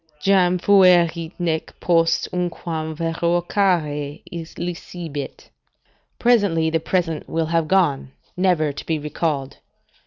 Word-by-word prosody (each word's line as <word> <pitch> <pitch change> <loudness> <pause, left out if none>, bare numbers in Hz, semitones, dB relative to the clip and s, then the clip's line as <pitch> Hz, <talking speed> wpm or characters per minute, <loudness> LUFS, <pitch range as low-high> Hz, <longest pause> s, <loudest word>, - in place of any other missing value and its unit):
"Jam 180 +1 +3
fuerit, 175 -4 +4
nec 165 -3 -3
post 165 -2 +2
unquam 165 -3 -3
revocare 165 -2 0 0.3
licebit." 170 -4 -6 0.7
["Presently 200 -10 +2
the 165 - +1
present 165 -2 -2
will 165 0 0
have 165 0 0
gone, 150 -8 +1 0.2
never 180 -5 +2
to - - -7
be 160 - 0
recalled." 150 -2 -3
165 Hz, 100 wpm, -21 LUFS, 155-180 Hz, 0.7 s, fuerit